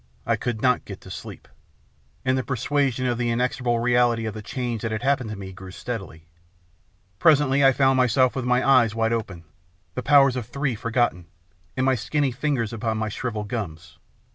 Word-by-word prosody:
I - - +2
could 120 -3 -4
not 125 -1 +3
get 100 -2 -9
to 95 - -12
sleep. - - -9 0.8
And 130 0 +2
the 130 - -1
persuasion 135 0 0
of 120 -1 0
the 120 -1 0
inexor 125 +2 -1
able 120 -1 +1
reality 120 -1 +2
of 110 - -3
the 110 - -7
change 120 0 -4
that 115 - -3
had 110 - -3
happened 135 -4 +1
to 110 - -5
me 95 -1 -8
grew 95 0 -10
steadily. 95 -6 -7 0.9
Presently 145 -3 +4
I 135 - +7
found 135 0 +3
myself 130 0 +3
with 130 - -2
my 125 +1 +1
eyes 120 -5 +4
wide 115 0 +1
open, 100 -7 -4 0.5
the 125 - -3
powers 135 -2 +5
of 125 -4 -4
three 140 +2 -2
forgotten, 115 -6 -1 0.5
and 130 - +1
my 135 - +4
skinny 135 +3 -1
ringers 130 -8 0
upon 110 -1 -2
my 110 0 -2
shrivelled 105 -2 -4
gums. 90 -8 -6
120 Hz, 190 wpm, -24 LUFS, 110-130 Hz, 0.9 s, I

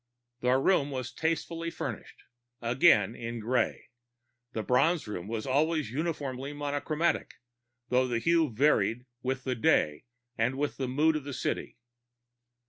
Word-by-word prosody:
The 125 +1 +3
room 145 0 +3
was 130 -3 -4
tastefully 165 +2 -2
furnished, - - -6 0.4
again 120 - +4
in 120 0 -5
gray; 120 +3 -1 0.6
the 110 - -3
Bronze 150 +5 +2
Room 100 -3 -5
was 110 0 -3
always 150 0 +1
uniformly 140 -2 -3
monochromatic, 145 +3 -1 0.5
though 130 +1 +3
the 120 -2 0
hue 165 +4 +3
varied 120 -2 +2 0.2
with 130 +1 -2
the 130 - -1
day 110 - +2 0.3
and 125 +4 +1
with 145 +1 -2
the 130 - -2
mood 150 +5 +3
of 155 - -2
the 140 0 -6
city. - - -3
130 Hz, 135 wpm, -29 LUFS, 120-155 Hz, 0.6 s, again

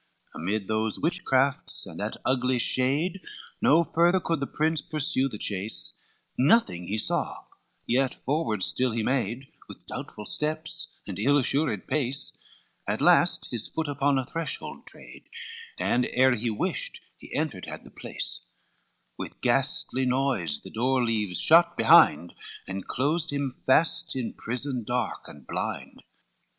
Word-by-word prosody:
XLV - - -8
Amid 100 +3 -1
those 110 0 0
witchcrafts 140 -5 +1
and - - -9
that - - -3
ugly 130 -1 +2
shade, 140 +10 0 0.4
No 165 +3 +5
further 170 +3 +3
could 165 -3 -1
the 140 - -2
prince 155 0 0
pursue 150 -3 0
the 110 - -6
chase, 95 - -2 0.5
Nothing 130 - +3
he 105 - -1
saw, - - -1 0.4
yet 130 +2 +1
forward 130 - 0
still 125 +3 0
he 115 -1 -1
made, 130 +1 -1 0.2
With - - -12
doubtful 105 - -7
steps, 155 +4 -3 0.2
and 95 -2 -6
ill 140 +7 +4
assured 135 -5 0
pace; 135 -2 -1 0.5
At - - 0
last - - +4
his 115 -2 -2
foot 160 -1 -3
upon 140 0 +1
a 130 - 0
threshold 165 0 -5
trad, - - -12 0.5
And 125 +1 +1
ere 130 0 +4
he 120 +1 -2
wist, 105 - -2 0.2
he - - -13
entered - - -2
had - - -7
the - - -14
place; - - -5 0.8
With - - -6
ghastly 130 0 +1
noise 125 - 0
the - - -11
door 125 +2 +1
leaves 105 -6 -1
shut 170 +2 +5
behind, 80 +3 +6 0.3
And 95 0 -5
closed 150 +5 0
him 140 -3 -3
fast 160 +4 +3
in 125 -3 -3
prison 125 +1 -3
dark 120 +3 -2
and 70 -3 -13
blind. - - -4
130 Hz, 145 wpm, -27 LUFS, 110-150 Hz, 0.8 s, behind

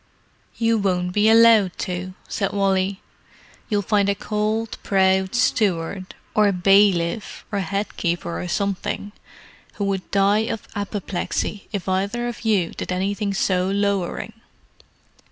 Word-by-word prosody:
"You 230 -1 +2
won't 180 -2 0
be 210 +2 +4
allowed 225 -4 +6
to," 185 +1 -5
said 195 -3 -2
Wally. 195 -1 +1 0.7
"You'll 205 -2 +1
find 200 0 +2
a 200 - +1
cold, 215 +2 -2
proud 190 0 +2
steward, 190 -6 0 0.2
or 210 -1 +4
bailiff, 195 0 +2
or 200 - -1
head 195 +3 -3
keeper 170 -1 -2
or 180 - -4
something, 200 +2 -2 0.6
who 205 - -3
would 195 -2 -2
die 200 +2 +3
of 220 - -5
apoplexy 200 0 -3
if 200 -4 -4
either 200 +6 -1
of 240 - -6
you 200 -6 +2
did - - -6
anything 200 +3 -1
so 185 -1 +1
lowering. 200 -2 -1
200 Hz, 130 wpm, -22 LUFS, 185-210 Hz, 0.7 s, allowed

